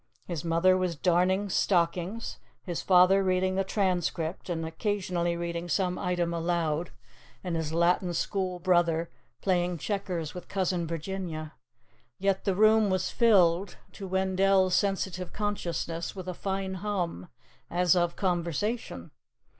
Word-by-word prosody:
His 170 -3 -4
mother 170 +3 +3
was 185 -2 0
darning 180 +5 +2
stockings, 180 +3 0 0.2
his 175 -3 -3
father 185 +1 +5
reading 185 0 +1
the 195 +1 +1
Transcript 180 -3 -1
and 165 -2 -2
occasionally 175 -1 -1
reading 170 0 -4
some 180 0 0
item 175 -1 -1
aloud, 170 -1 -1 0.5
and 180 -3 -2
his 160 -2 -2
Latin 175 +2 +2
School 185 +1 -1
brother 170 -2 +1 0.3
playing 180 -2 +1
checkers 180 -4 -3
with 180 - -8
Cousin 180 -3 -1
Virginia. 165 -2 -5 0.6
Yet 195 0 0
the 195 - +1
room 215 +1 +5
was 185 -1 0
filled, 190 -5 +3
to 195 - -8
Wendell's 190 0 +2
sensitive 190 -2 -1
consciousness, 170 -5 -3
with 185 -1 -7
a 185 - -2
fine 190 +1 -3
hum, 180 - -2 0.4
as 180 0 +3
of 175 -1 +1
conversation. 185 +5 -2
180 Hz, 130 wpm, -28 LUFS, 170-190 Hz, 0.6 s, father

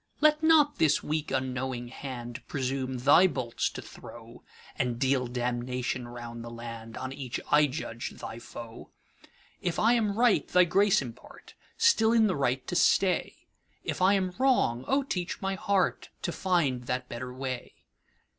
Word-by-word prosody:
Let 305 0 +4
not 315 -2 +4
this 155 - +3
weak 155 0 -2
unknowing 130 -2 -2
handPresume 130 0 -4
thy 155 +7 +7
bolts 130 -7 -2
to - - -8
throw, - - -12 0.3
And 120 -2 -1
deal 130 0 +1
damnation 125 0 -2
round 120 -1 -8
the 120 - -7
landOn 115 +2 -7
each 130 -3 -5
I 150 0 +6
judge 125 -4 -5
thy 115 - -8
foe. 115 0 -10 0.7
If 175 -2 -2
I 230 +2 +4
am 215 -4 +1
right, 240 -2 +3
thy 180 0 +5
grace 195 -1 +3
impart, 120 -2 -12 0.2
Still 450 - +4
in 225 -2 +5
the 195 - +1
right 130 -2 0
to 180 - -4
stay; 185 0 +2 0.4
If - - -3
I 190 +2 +5
am 185 -2 -1
wrong, 135 - +2
O 275 +1 +2
teach 180 -9 -3
my 195 0 -2
heartTo 195 -4 -1
find 150 -11 0
that 125 +1 -2
better 125 +1 -6
way. 130 -1 -5
135 Hz, 150 wpm, -28 LUFS, 125-190 Hz, 0.7 s, thy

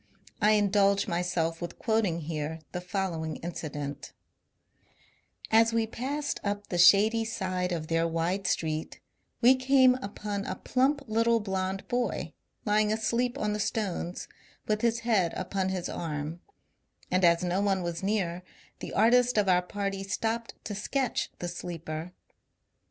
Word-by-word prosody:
I 210 +1 +5
indulge 200 -1 +3
myself 170 -2 -1
with 175 - -6
quoting 215 -7 0
here 155 0 -4
the 180 - -4
following 180 -4 -2
incident: 150 -4 -6 0.7
— - - -22
As 225 +1 +5
we 230 -1 +2
passed 275 +6 -3
up 205 0 -3
the 175 - -1
shady 210 +6 +6
side 185 -5 -2
of 165 -3 -2
their 165 +1 +1
wide 170 +4 -1
street, 155 -2 -2 0.4
we 250 +2 +8
came 260 0 +5
upon 205 -2 -4
a 185 - -3
plump 275 +6 +1
little 230 +1 +2
blond 190 -1 -3
boy, 245 0 -2 0.3
lying 210 0 +3
asleep 235 +4 0
on 210 -5 -1
the 210 - -3
stones, 195 -5 -2 0.4
with 215 0 0
his 230 0 +1
head 210 -8 +2
upon 190 +1 -2
his 185 -2 -2
arm; 155 0 -4 0.7
and 185 +1 +2
as 170 0 +5
no 180 +2 0
one 195 -2 +1
was 170 -1 -3
near, 190 -4 -1 0.4
the - - -7
artist 245 +3 +4
of 205 -2 +3
our 180 -1 +4
party 195 +1 -3
stopped 225 +4 -2
to 210 - -5
sketch 250 +5 -1
the 175 - -4
sleeper. 170 -1 -6
195 Hz, 145 wpm, -29 LUFS, 175-220 Hz, 0.7 s, we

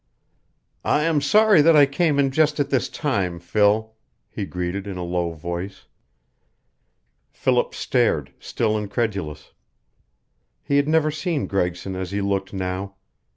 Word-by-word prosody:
"I 150 - +2
am 160 -2 +2
sorry 210 +4 +5
that 165 +2 +5
I 145 -1 +7
came 145 +2 0
in 140 -1 +2
just 150 +1 +2
at 145 0 -1
this 130 - +1
time, 100 - -2
Phil," 105 +5 +1 0.4
he 100 - -5
greeted, 90 +3 -4
in 95 -2 -5
a 90 - -4
low 85 -1 -1
voice. 85 +4 -6 1.4
Philip 125 -2 0
stared, 115 - 0
still 110 -2 -1
incredulous. 100 -8 -3 1.1
He 140 - +1
had 145 0 +2
never 155 -1 +2
seen 155 0 -2
Gregson 90 0 -2
as 95 -1 -4
he 100 +2 -2
looked 100 -1 -1
now. 95 +1 -4
105 Hz, 140 wpm, -22 LUFS, 90-145 Hz, 1.4 s, I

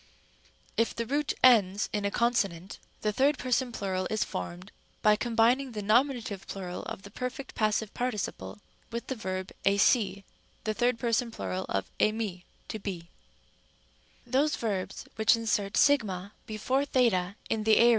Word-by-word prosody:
If 230 - +1
the 230 - -2
root 285 +4 0
ends 205 -6 +5
in 205 -1 -1
a - - +2
consonant, 200 -6 0 0.2
the 210 -1 0
third 280 +6 +3
person 255 0 0
plural 190 -4 -2
is 215 - +1
formed 175 - -6 0.3
by 210 -1 +6
combining 240 +3 +2
the 210 -1 -4
nominative 230 -3 +1
plural 180 -2 -5
of 195 - -6
the 200 - -11
perfect. 250 +4 -5
passive 215 -1 0
parti 245 -2 -1
ciple 200 - -5 0.3
and 235 +1 -2
the - - -3
verb 185 -5 -4
εἰσί, 200 0 +3 0.4
the 215 - 0
third 240 +1 +1
person 230 0 +1
plural 185 -4 -4
of 95 -1 -2
εἰμί, 215 -5 0 0.3
to 220 - -4
be. 200 0 -3
Rem. 180 - -6
b. 170 +1 -18 1.2
Those 285 +4 +3
verbs 200 -5 -3
which 220 +1 +5
insert 210 -3 -1
¢ 205 -9 +2 0.2
before 225 +5 0
θ 205 -9 +2 0.2
in 220 -1 0
the 220 0 +5
aor. 235 - +7
215 Hz, 160 wpm, -29 LUFS, 195-240 Hz, 1.2 s, aor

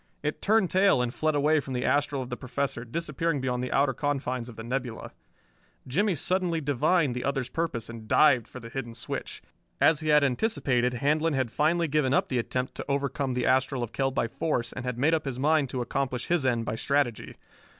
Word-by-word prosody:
It 150 0 -2
turned 210 -3 +3
tail 190 -6 +4
and 125 -1 -1
fled 155 +1 0
away 150 +2 +3
from 135 -2 -6
the 125 - -1
astral 140 0 +1
of 125 - -10
the - - -1
Professor, 130 -1 -3
disappearing 155 +3 -2
beyond 125 -1 -1
the 125 - -4
outer 135 -1 +2
confines 130 -4 -2
of 115 - -11
the 115 - -8
nebula. 125 -1 -4 0.8
Jimmie 190 +8 +1
suddenly 175 +2 +1
divined 145 +1 +2
the 125 - -4
other's 135 -2 -1
purpose 135 -8 -2
and 115 -2 -9
dived 130 -5 +4
for 125 - -10
the 115 -1 -10
hidden 120 -2 -5
switch. - - -5 0.4
As 155 -2 +4
he 155 - -5
had 150 -1 +5
anticipated, 125 - +1
Handlon 150 +5 +1
had 130 -4 -1
finally 165 +5 +2
given 140 -3 +1
up - - +1
the 130 - 0
attempt 125 +2 -2
to - - -5
overcome 140 -1 -1
the 125 - 0
astral 130 0 +2
of 115 - -6
Kell 135 -1 +1
by 135 -3 -1
force 120 -2 -2
and 125 - -6
had 125 -2 -3
made 145 +6 +2
up 160 -2 0
his 135 -3 -3
mind 150 0 +2
to 125 -1 -2
accomplish 125 0 -2
his 170 -6 +1
end 120 -3 0
by 105 - -2
strategy. 130 0 -1
135 Hz, 210 wpm, -27 LUFS, 125-150 Hz, 0.8 s, had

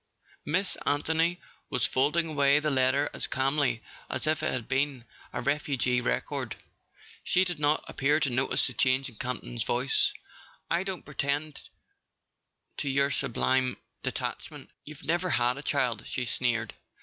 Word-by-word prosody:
Miss 185 +6 +2
Anthony 160 +4 +1 0.3
was - - +2
folding 150 +6 +2
away 145 -2 +3
the 150 0 -1
letter 135 +2 +3
as - - +1
calmly 135 -3 +1 0.3
as - - -1
if 155 0 +1
it - - 0
had 120 -3 -3
been 135 -2 0 0.3
a - - -4
refugee 135 -3 +1
record. - - -2 0.7
She 185 - +3
did 175 -4 -3
not 150 +1 +2
appear 145 +3 +1
to 140 - +2
notice 130 +2 +3
the 130 - +1
change 130 +1 +2
in 115 - -15
Campton's 120 -1 -3
voice. 125 +4 +3 0.6
"I 170 +1 +2
don't 190 -2 -5
pretend 145 +1 -2 1.1
to 140 - -2
your 140 +1 +2
sublime 130 0 +1 0.2
detachment: - - -4
you've 150 -1 -11
never 175 +3 0
had 125 -3 +1
a - - -5
child," 125 -7 0
he 125 - -2
sneered. 115 -3 0
140 Hz, 150 wpm, -28 LUFS, 125-150 Hz, 1.1 s, away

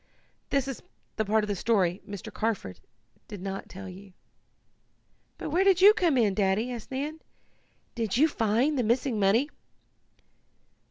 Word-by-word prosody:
That 275 -1 +1
is 270 - -5 0.4
the 220 - 0
part 215 +1 +2
of - - -3
the 205 - -1
story 190 -3 +1
Mr. 200 -2 -7
Carford 210 - -3 0.5
did 205 -3 -8
not 195 +1 -6
tell 195 +1 -9
you." 190 +1 -12 1.2
"But - - -5
where 355 +5 +3
do 390 -1 +5
you 420 - +10
come 345 -10 +2
in, 215 -5 +3
Daddy?" 200 +5 +1
asked 235 -3 -7
Nan. 290 +4 -4 0.7
"Did 230 -2 -1
you 305 +4 +5
find 255 +2 +1
the - - +2
missing 235 +1 +1
money?" 220 +9 +3
225 Hz, 155 wpm, -28 LUFS, 200-270 Hz, 1.2 s, you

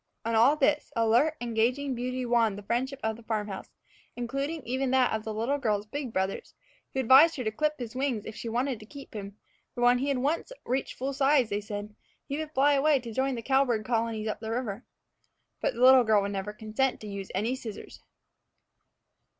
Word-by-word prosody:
And 230 0 0
all 240 +7 +6
this 295 0 +1
alert, 235 +7 +3
engaging 240 +4 0
beauty 250 +1 -3
won 235 -4 +2
the 205 - -9
friendship 260 +6 -2
of 220 0 -1
the - - -13
farm 220 -2 -2
house, 195 - -7 0.5
including 275 +6 -3
even 260 +2 -1
that 260 -2 +3
of 220 -1 -2
the 220 - -4
little 235 +7 -1
girl's 210 -5 0
big 265 +3 -5
brothers, 190 -1 -3 0.4
who 265 - -2
advised 270 +7 +7
her 255 - -3
to 215 - -1
clip 305 +6 0
his 240 -2 -7
wings 255 -5 -1
if 220 - -7
she 230 - -5
wanted 245 +1 -1
to 215 - -13
keep 280 +2 -11
him; 200 -1 -7 0.4
for 245 - -4
when 245 0 +5
he 275 - -1
had 280 -2 +1
once 290 - -1
reached 260 +2 -2
full 270 +2 -2
size, 270 -3 +3
they 205 +1 -1
said, 210 0 -6 0.3
he 280 +2 -3
would 310 -1 -5
fly 290 0 +4
away 285 0 +3
to 235 -2 -8
join 265 +2 0
the 230 - -6
cowbird 265 -5 +2
colonies 225 -2 -1
up 215 - -3
the 220 0 -6
river. 230 -1 -3 0.8
But - - 0
the 235 - -5
little 260 0 +8
girl 215 -3 +3
would 200 - -2
never 195 +1 -3
consent 220 +5 -1
to 215 - -7
any 205 - -6
use 195 - -7
of 195 - 0
the 245 +4 0
scissors. 225 -5 -9
240 Hz, 215 wpm, -28 LUFS, 220-270 Hz, 0.8 s, little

